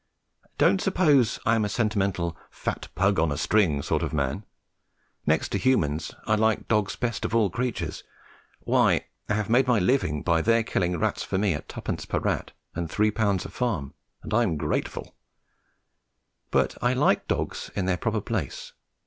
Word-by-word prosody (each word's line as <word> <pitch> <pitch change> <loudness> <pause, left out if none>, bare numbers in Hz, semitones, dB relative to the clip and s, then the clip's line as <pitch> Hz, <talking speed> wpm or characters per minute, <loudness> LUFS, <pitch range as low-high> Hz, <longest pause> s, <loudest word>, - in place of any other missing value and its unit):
Don't 195 - +4
suppose 150 - +3
I 115 - +4
am 115 -1 +2
a 105 - -1
sentimental 100 -6 0
"fat - - -4
pug 100 -1 +2
on 80 -1 +2
a 70 - -2
string" 80 -5 +2
sort - - 0
of - - -3
man. 70 +7 -1 0.8
Next 80 +1 +2
to 100 - -1
humans 80 - +1
I 110 - +2
like 110 0 +1
dogs 105 -3 +1
best 120 -5 -2
of 115 - -1
all 105 -5 +3
creatures. 115 -8 -3 0.6
Why, - - +2 0.2
I 105 - +2
have 105 -1 -1
made 125 +3 +3
my 125 -2 +4
living 90 - +1
by 85 -2 +2
their 115 +4 +3
killing 90 -5 0
rats - - 0
for - - -2
me 100 -2 +2
at 75 - -7
twopence - - -4
per - - -2
rat - - -1 0.2
and 85 -1 -3
three 105 +4 +2
pound 100 -4 0
a - - -6
farm, 90 - -2 0.3
and - - -6
I 120 - +4
am 90 -10 +1
grateful: 75 +1 -3 1.3
but 65 -1 +1
I 120 +1 +2
like 135 +3 +2
dogs - - -2
in 95 - -1
their 90 -1 +1
proper - - -1
place. - - -4
100 Hz, 180 wpm, -26 LUFS, 85-115 Hz, 1.3 s, Don't